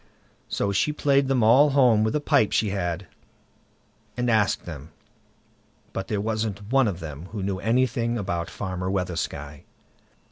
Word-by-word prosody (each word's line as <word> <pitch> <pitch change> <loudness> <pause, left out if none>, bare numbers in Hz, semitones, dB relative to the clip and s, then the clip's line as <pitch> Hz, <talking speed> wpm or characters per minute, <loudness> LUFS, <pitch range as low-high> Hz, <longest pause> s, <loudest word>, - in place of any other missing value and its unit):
So 100 - -1
she 100 +9 +1
played 140 -2 +2
them 130 -4 +2
all 130 +7 +6
home 125 -6 +4
with 110 - 0
a - - +2
pipe 140 -7 +2
she 105 -3 +1
had, 90 -2 -2 1.1
and 125 -1 +1
asked 105 -3 +1
them, 80 -3 -8 1.0
but 95 - -4
there 105 - -1
wasn't 110 -1 -3
one 135 -2 +4
of 95 -4 -3
them 80 +1 -7
who 100 0 -6
knew 95 -1 -2
anything 120 +1 +1
about 85 -5 -3
Farmer 90 -2 -4
Weathersky. 85 -6 -3
105 Hz, 150 wpm, -25 LUFS, 90-120 Hz, 1.1 s, all